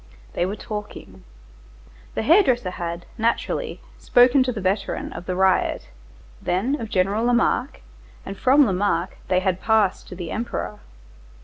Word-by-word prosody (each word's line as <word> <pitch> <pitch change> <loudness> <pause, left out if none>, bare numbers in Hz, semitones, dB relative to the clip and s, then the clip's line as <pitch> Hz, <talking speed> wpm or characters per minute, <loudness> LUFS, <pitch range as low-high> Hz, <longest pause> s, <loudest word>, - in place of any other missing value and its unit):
They 175 - 0
were 200 - -3
talking. 210 - -8 0.9
The - - -1
hair 335 - +6
dresser 245 - 0
had, 170 -1 -5
naturally, 235 - -1 0.2
spoken 250 +2 +5
to 255 0 +1
the 225 - -5
veteran 195 +1 -2
of 170 +1 -9
the 185 - -1
riot, 190 0 +1 0.5
then 235 +11 -1
of 225 - -5
General 200 +4 +1
Lamarque, 245 +2 +1 0.4
and 195 - -6
from 270 +6 +5
Lamarque 190 -3 0
they 185 0 +2
had 185 -1 -1
passed 220 -4 +1
to 180 - -9
the 175 -3 -6
Emperor. 220 -2 -4
205 Hz, 145 wpm, -23 LUFS, 185-240 Hz, 0.9 s, hair